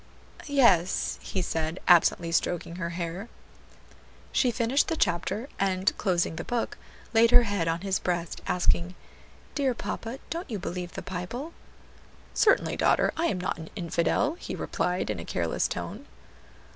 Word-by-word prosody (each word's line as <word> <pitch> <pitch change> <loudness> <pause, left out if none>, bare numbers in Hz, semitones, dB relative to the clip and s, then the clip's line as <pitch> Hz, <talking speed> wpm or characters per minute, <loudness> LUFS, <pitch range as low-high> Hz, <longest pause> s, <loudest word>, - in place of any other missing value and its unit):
"Yes," 235 - +3
he 190 - -2
said, 160 +1 -2
absently 170 -1 +5
stroking 170 0 -1
her 170 -2 -2
hair. 175 +5 -4 1.0
She 255 - +3
finished 240 +4 +2
the 325 - 0
chapter, 195 - 0
and 190 0 +1
closing 175 -4 +1
the - - -3
book, 240 -1 -2 0.3
laid 230 +1 +6
her 245 0 +8
head 200 -6 -1
on 165 +1 0
his 195 -1 0
breast, 175 -2 -2
asking, 180 0 +1 0.6
"Dear 270 -4 +1
papa, 230 +2 -4
don't 335 0 -4
you 220 - -2
believe 180 -1 -5
the - - -6
Bible?" 185 - -5 0.8
"Certainly, 410 - +3
daughter; - - +3
I 335 +1 +1
am 185 - -1
not 180 - -2
an 160 - -8
infidel," 170 - +1
he - - -5
replied 180 +1 -1
in - - -4
a - - -5
careless - - 0
tone. - - -6
185 Hz, 150 wpm, -28 LUFS, 170-235 Hz, 1.0 s, her